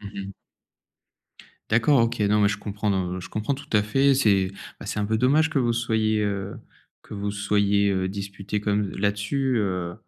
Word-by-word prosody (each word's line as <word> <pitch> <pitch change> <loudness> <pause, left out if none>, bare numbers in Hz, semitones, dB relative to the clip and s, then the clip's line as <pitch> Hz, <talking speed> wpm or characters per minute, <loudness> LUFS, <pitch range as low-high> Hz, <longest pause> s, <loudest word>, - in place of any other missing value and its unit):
Mmh 100 -1 -8
mh. - - -8 1.4
D'accord, 120 +4 +4
OK. 115 0 0
non 105 +1 +3
mais 100 - +4
je 105 - -1
comprends, 105 0 -3 0.2
heu, 95 - -4
je 90 - -9
comprends 110 +6 -2
tout 140 +1 -7
à 105 - +5
fait. 135 +6 +3
C'est, 100 -8 +3 0.3
bah, - - -8
c'est - - -3
un - - 0
peu 110 +1 0
dommage 150 +6 +3
que 155 - 0
vous 125 - +1
vous 120 - +2
soyez, 110 -2 +1
heu, 100 -1 -3 0.5
que - - -13
vous 100 - -6
vous 100 - 0
soyez 100 -2 +1
disputés 100 +1 -4
comme 105 -1 0
là-dessus, 105 +6 0
heu 90 -4 -2
105 Hz, 195 wpm, -24 LUFS, 100-115 Hz, 1.4 s, à